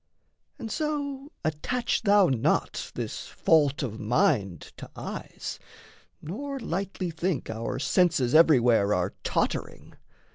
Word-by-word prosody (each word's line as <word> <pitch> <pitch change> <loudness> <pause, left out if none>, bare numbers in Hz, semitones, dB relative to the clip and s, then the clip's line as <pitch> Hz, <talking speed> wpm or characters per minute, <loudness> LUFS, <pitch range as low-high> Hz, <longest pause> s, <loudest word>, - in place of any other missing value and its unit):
And 230 -6 -6
so 290 -2 -3
Attach 230 +11 -1
thou 205 -3 +5
not 125 -6 0
this - - -5
fault 150 -3 +2
of 110 -4 -4
mind 100 -6 +1
to - - -9
eyes, - - -6 0.6
Nor 275 - -5
lightly 190 -3 -3
think 165 -6 -2
our 115 +3 -4
senses 140 -4 +2
everywhere 120 -10 +5
Are 90 +2 -1
tottering. - - -2
160 Hz, 110 wpm, -27 LUFS, -, 0.6 s, thou